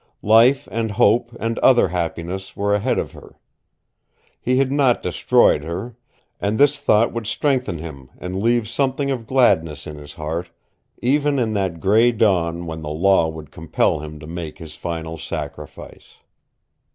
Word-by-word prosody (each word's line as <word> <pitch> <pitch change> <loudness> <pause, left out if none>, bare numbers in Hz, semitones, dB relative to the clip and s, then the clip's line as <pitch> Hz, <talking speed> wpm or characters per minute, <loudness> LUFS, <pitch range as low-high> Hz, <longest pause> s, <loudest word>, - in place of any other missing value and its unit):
Life 115 +6 +5
and 115 -1 -1
hope 120 +2 +3
and 115 +1 -2
other 120 -7 +5
happiness 90 +2 -4
were 100 0 +1
ahead 105 +5 +1
of - - -2
her. - - -15 1.0
He 130 +1 +1
had 135 0 +2
not 135 -4 +2
destroyed 75 - +3
her, 95 +9 -5 0.4
and 105 +2 -1
this 145 +2 +4
thought 110 -3 +3
would 115 -2 -4
strengthen 130 - 0
him 75 -5 -9
and 90 +2 -5
leave 120 0 +2
something 135 +3 -1
of 120 -4 -4
gladness 80 - +2
in 75 -1 -8
his 75 -1 -11
heart, 80 +4 -4 0.5
even 145 +3 +2
in 115 -4 0
that 95 -5 -2
gray 110 +6 +4
dawn 85 -7 +1
when 80 -1 -6
the 75 - -5
law 85 +1 +3
would 80 -2 -9
compel 80 -2 0
him 75 0 -8
to 75 - -10
make 80 -1 -7
his 80 -2 -10
final 80 -1 -5
sacrifice. - - -8
100 Hz, 160 wpm, -21 LUFS, 80-120 Hz, 1.0 s, Life